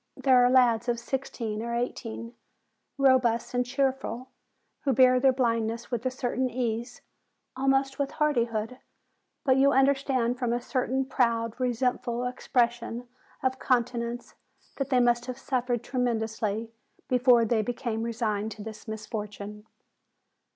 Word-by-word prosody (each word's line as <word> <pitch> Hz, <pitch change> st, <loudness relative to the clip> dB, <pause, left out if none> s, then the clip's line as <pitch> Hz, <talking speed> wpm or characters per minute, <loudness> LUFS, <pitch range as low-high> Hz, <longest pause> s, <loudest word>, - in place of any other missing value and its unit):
There 255 Hz, -2 st, +5 dB
are 245 Hz, -, +5 dB
lads 245 Hz, -2 st, +4 dB
of 235 Hz, -1 st, 0 dB
sixteen 235 Hz, -4 st, -4 dB
or 235 Hz, +1 st, -3 dB
eighteen, 230 Hz, -1 st, -4 dB, 0.6 s
robust 255 Hz, -4 st, +3 dB
and 245 Hz, 0 st, +2 dB
cheerful, 260 Hz, -1 st, -2 dB, 0.5 s
who 275 Hz, -, +2 dB
bear 255 Hz, 0 st, +5 dB
their 265 Hz, +1 st, +5 dB
blind 230 Hz, -3 st, +1 dB
ness 230 Hz, +2 st, -6 dB
with 240 Hz, -2 st, -2 dB
a -, -, +2 dB
certain 255 Hz, 0 st, -1 dB
ease, 240 Hz, 0 st, -3 dB, 0.5 s
almost 270 Hz, +1 st, +1 dB
with 280 Hz, -1 st, 0 dB
hardihood; 240 Hz, -5 st, 0 dB, 0.7 s
but 260 Hz, -1 st, +4 dB
you 275 Hz, +1 st, +5 dB
understand 265 Hz, -3 st, +2 dB
from 240 Hz, -2 st, 0 dB
a 240 Hz, -, 0 dB
certain 260 Hz, +1 st, -1 dB
proud, 230 Hz, -2 st, 0 dB
resentful 245 Hz, 0 st, 0 dB
expres 250 Hz, -1 st, +1 dB
sion 240 Hz, +1 st, -7 dB, 0.4 s
of 260 Hz, 0 st, 0 dB
countenance 240 Hz, -1 st, -1 dB, 0.4 s
that 275 Hz, -1 st, -2 dB
they 255 Hz, -2 st, +3 dB
must 240 Hz, 0 st, +2 dB
have 255 Hz, 0 st, -4 dB
suffered 250 Hz, -3 st, -1 dB
tremendously 225 Hz, -3 st, -2 dB, 0.4 s
before 250 Hz, -2 st, +4 dB
they 220 Hz, 0 st, +2 dB
became 235 Hz, 0 st, -3 dB
resigned 220 Hz, -2 st, -1 dB
to 205 Hz, -, -9 dB
this 220 Hz, +1 st, -9 dB
misfortune. 210 Hz, -1 st, -6 dB
245 Hz, 135 wpm, -27 LUFS, 230-260 Hz, 0.7 s, There